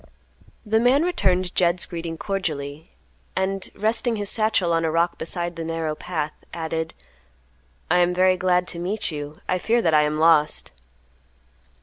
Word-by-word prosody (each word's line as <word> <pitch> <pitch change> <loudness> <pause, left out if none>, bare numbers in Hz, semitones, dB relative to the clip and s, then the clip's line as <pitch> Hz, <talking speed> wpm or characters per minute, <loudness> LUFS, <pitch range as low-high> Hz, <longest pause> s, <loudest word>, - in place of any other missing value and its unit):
The 220 +1 +2
man 255 +6 +4
returned 185 - +1
Jed's 175 0 +3
greeting 165 -1 -5
cordially, 155 -7 -4 0.5
and, 190 0 -1
resting 225 +3 +1
his 205 -2 -2
satchel 215 -6 +2
on 165 0 +1
a 160 - +1
rock 170 +2 +1
beside 175 +1 -3
the 165 - -5
narrow 165 -1 -2
path, 155 -1 -4 0.2
added, 160 -1 -3 1.0
"I 180 - +5
am 175 0 +3
very 185 +1 +4
glad 180 -1 +2
to 170 - -6
meet 190 +3 -1
you. 145 0 -6
I 185 - +1
fear 230 +6 +2
that 165 - +2
I 150 - +6
am 150 0 0
lost." 155 -1 +3
175 Hz, 155 wpm, -23 LUFS, 160-190 Hz, 1.0 s, I